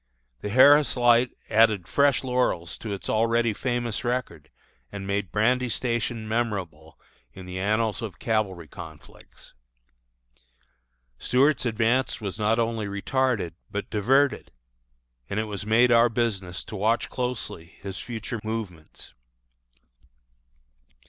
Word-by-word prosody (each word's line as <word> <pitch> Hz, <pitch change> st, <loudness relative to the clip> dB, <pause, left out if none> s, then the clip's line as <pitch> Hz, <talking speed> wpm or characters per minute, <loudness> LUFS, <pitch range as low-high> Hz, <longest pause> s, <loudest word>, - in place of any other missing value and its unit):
The 105 Hz, -, -5 dB
Harris 140 Hz, +5 st, +6 dB
Light 120 Hz, 0 st, +4 dB, 0.2 s
added 110 Hz, -5 st, +3 dB
fresh 140 Hz, -2 st, +3 dB
laurels 125 Hz, -10 st, 0 dB
to 110 Hz, -, -6 dB
its 100 Hz, -, -5 dB
already 115 Hz, +1 st, +2 dB
famous 120 Hz, -1 st, -2 dB
record, 125 Hz, +1 st, -3 dB, 0.4 s
and 100 Hz, -1 st, -6 dB
made 100 Hz, -3 st, -2 dB
Brandy 125 Hz, +4 st, +2 dB
Station 115 Hz, -2 st, -2 dB
memorable 95 Hz, -9 st, -3 dB, 0.3 s
in 95 Hz, -, -10 dB
the 90 Hz, 0 st, -6 dB
annals 110 Hz, +3 st, 0 dB
of 110 Hz, -4 st, -6 dB
cavalry 100 Hz, -7 st, -1 dB
conflicts. 80 Hz, 0 st, -13 dB, 1.7 s
Stuart's 130 Hz, +1 st, +2 dB
advance 115 Hz, +3 st, +1 dB
was 100 Hz, -2 st, -5 dB
not 110 Hz, +2 st, +2 dB
only 115 Hz, -2 st, -1 dB
retarded, 100 Hz, -, -1 dB, 0.2 s
but 100 Hz, 0 st, -5 dB
diverted; 130 Hz, +7 st, +2 dB, 0.8 s
and 100 Hz, -, -1 dB
it -, -, 0 dB
was 105 Hz, -1 st, -6 dB
made 120 Hz, +3 st, +4 dB
our 120 Hz, 0 st, +6 dB
business 100 Hz, -6 st, -2 dB
to -, -, -9 dB
watch 110 Hz, +4 st, +1 dB
closely 125 Hz, -9 st, -4 dB
his 95 Hz, 0 st, -6 dB
future 115 Hz, -1 st, -5 dB
movements. 105 Hz, -8 st, -7 dB
110 Hz, 120 wpm, -25 LUFS, 100-120 Hz, 1.7 s, Harris